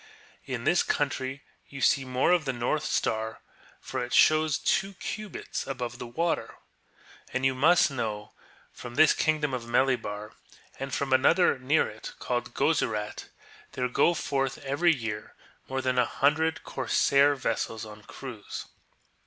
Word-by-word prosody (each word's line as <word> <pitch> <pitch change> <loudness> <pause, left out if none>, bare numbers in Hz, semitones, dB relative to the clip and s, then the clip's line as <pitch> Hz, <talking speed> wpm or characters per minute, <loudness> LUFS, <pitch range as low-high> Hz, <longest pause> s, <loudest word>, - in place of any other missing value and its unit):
In - - -4
this - - +3
country 130 +2 -2 0.3
you 140 - -8
see 135 0 +3
more 130 +5 +1
of 175 -3 +3
the 135 - -1
Xortii 120 +5 0
Star, 110 0 -1 0.4
for - - -4
it 125 +1 -6
shows 155 -2 +5
two 195 0 0
cubits 215 +2 -5
above 120 -3 -4
the 125 - -6
water. 165 +8 -1 0.8
\m\ 130 - 0
you 135 0 +3
must 155 +4 +4
know 110 -5 -4 0.4
that - - -18
from 120 -1 -8
this 155 +1 +6
kingdom 150 -3 0
of 125 -2 -3
Melibar, 120 -4 0 0.5
and 135 +1 -4
from 135 0 -1
another 140 +3 +4
near 140 +5 +2
it 110 +1 -9
called 120 -1 -3
(jo/urat, 115 -8 0 0.4
there 125 -1 -1
go 170 +7 +3
forth 135 -3 -1
every 145 +6 +3
year 110 -7 -4 0.3
more 130 0 -2
than 125 -1 +1
a 125 - +3
himdred 160 +3 +1
corsair 140 +1 +3
vessels 115 -3 -2
on 105 0 -11
cruize. 115 -1 -8
130 Hz, 150 wpm, -28 LUFS, 120-150 Hz, 0.8 s, this